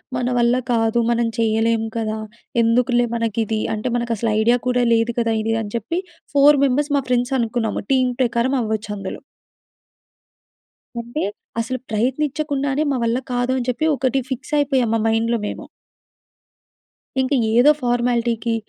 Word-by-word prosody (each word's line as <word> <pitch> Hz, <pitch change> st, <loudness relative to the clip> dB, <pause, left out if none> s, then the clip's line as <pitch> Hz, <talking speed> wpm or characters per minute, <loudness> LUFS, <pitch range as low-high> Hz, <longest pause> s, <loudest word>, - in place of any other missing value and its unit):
"మన 250 Hz, -, -1 dB
వల్ల 240 Hz, +1 st, +3 dB, 0.2 s
కాదు 225 Hz, 0 st, +2 dB
మనం 235 Hz, 0 st, +1 dB
చేయలేము 225 Hz, 0 st, +1 dB
కదా! 220 Hz, -1 st, -2 dB, 0.4 s
ఎందుకులే 240 Hz, +1 st, +3 dB
మనకిది. 225 Hz, -1 st, -1 dB, 0.2 s
అంటే, 215 Hz, +4 st, -4 dB
మనకసలు 235 Hz, -2 st, -1 dB
ఐడియా 240 Hz, +2 st, +4 dB
కూడా 250 Hz, 0 st, +2 dB
లేదు 230 Hz, +1 st, +2 dB
కదా! 230 Hz, -1 st, +1 dB
ఇది 225 Hz, +1 st, 0 dB
అని 205 Hz, 0 st, -7 dB
చెప్పి 235 Hz, -, -2 dB, 0.3 s
4 285 Hz, 0 st, +6 dB
మెంబర్స్ 285 Hz, +3 st, 0 dB
మా -, -, +1 dB
ఫ్రెండ్స్ 245 Hz, +2 st, +1 dB
అనుకున్నాము. 230 Hz, -2 st, -1 dB
టీమ్ 255 Hz, -1 st, +2 dB
ప్రకారం 240 Hz, +2 st, +1 dB
అవ్వచ్చందులో. 210 Hz, -3 st, -4 dB, 1.8 s
అంటే, 240 Hz, +7 st, -4 dB, 0.4 s
అసలు 255 Hz, +2 st, -2 dB
ప్రయత్నిచకుండానే, 280 Hz, +4 st, -1 dB
"మా 265 Hz, -, 0 dB
వల్ల 230 Hz, +1 st, +1 dB, 0.2 s
కాదు" 245 Hz, +1 st, 0 dB
అని 250 Hz, 0 st, -3 dB
చెప్పి 280 Hz, +6 st, 0 dB
ఒకటి 265 Hz, +1 st, 0 dB
ఫిక్స్ 260 Hz, -, -5 dB
అయిపోయాం. 265 Hz, -5 st, +1 dB
మా 225 Hz, -, +2 dB
మైండ్‌లో 230 Hz, +1 st, +1 dB
మేము. -, -, -6 dB, 1.6 s
ఇంక 260 Hz, +2 st, 0 dB, 0.2 s
ఏదో 245 Hz, +6 st, +6 dB
ఫార్మాలిటీకి 240 Hz, -1 st, 0 dB
235 Hz, 135 wpm, -21 LUFS, 225-255 Hz, 1.8 s, 4